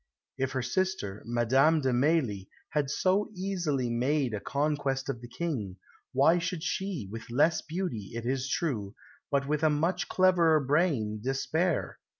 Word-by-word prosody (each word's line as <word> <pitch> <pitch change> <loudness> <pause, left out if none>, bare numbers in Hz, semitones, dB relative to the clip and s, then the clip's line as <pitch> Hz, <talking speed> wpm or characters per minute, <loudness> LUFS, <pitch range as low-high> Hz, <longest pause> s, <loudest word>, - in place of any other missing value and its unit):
If 135 0 -2
her 130 -2 -1
sister, 125 - -1
Madame 130 +7 +3
de 130 -2 +1
Mailly, 125 - +1 0.2
had 150 -3 0
so 190 +8 +1
easily 175 -9 -1
made 125 +2 0
a 105 - -2
conquest 140 0 -1
of 120 -4 -3
the 120 - -8
King, 120 - -3 0.4
why 150 +7 +4
should 170 -1 -3
she, 185 - -2
with 115 +1 -8
less 145 +8 +3
beauty, 160 - -4
it 115 0 -4
is 130 +2 -1
true, 110 -12 -2 0.3
but 140 -1 0
with 150 0 0
a 155 - +4
much 165 +5 0
cleverer 175 -4 +4
brain, 140 -7 +1
despair? 155 +7 -1
140 Hz, 150 wpm, -29 LUFS, 120-165 Hz, 0.4 s, why